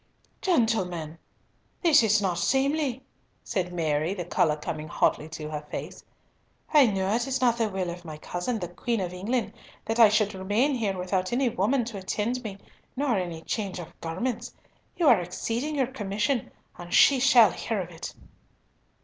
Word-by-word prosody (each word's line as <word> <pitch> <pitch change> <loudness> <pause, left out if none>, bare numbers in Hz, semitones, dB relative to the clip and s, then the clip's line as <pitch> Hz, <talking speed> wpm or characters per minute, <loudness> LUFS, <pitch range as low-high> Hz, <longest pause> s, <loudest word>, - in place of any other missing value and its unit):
"Gentlemen, 185 - 0 0.6
this 320 -6 +6
is 215 -2 +3
not 180 -2 0
seemly," 270 - +1 0.4
said 180 -2 -2
Mary, 160 +1 0
the 175 -3 -4
colour 155 -2 +2
coming 155 0 -5
hotly 150 - +1
into 155 -1 -7
her 150 -1 -3
face. - - -6 0.7
"I 290 -4 +7
know 195 -1 0
it 240 +2 0
is 265 0 -1
not 240 -2 +2
the 225 -2 +1
will 190 -3 -2
of 175 0 -9
my 155 -3 -8
cousin, 180 +9 -3
the 180 -4 -4
Queen 230 +6 -2
of 180 -2 -3
England, 220 +7 -2 0.3
that 225 +1 -2
I 225 -2 +9
should 215 0 +2
remain 205 +9 +1
here 210 -6 -1
without 185 0 -1
any 250 +1 +2
woman 230 +5 +1
to 220 -4 -6
attend 220 +6 -2
me, 200 -3 -6 0.4
nor 270 -3 +1
any 175 -4 -3
change 200 -5 -3
of 170 -1 -8
garments. 200 +9 -3 0.4
You 335 - +2
are 230 -9 +6
exceeding 230 - -3
your 270 -2 +2
commission, 230 +1 -2 0.3
and 175 0 -9
she 275 -2 +6
shall 240 -5 +6
hear 220 +3 -3
of 175 -2 -5
it." 165 - -8
205 Hz, 175 wpm, -27 LUFS, 175-245 Hz, 0.7 s, I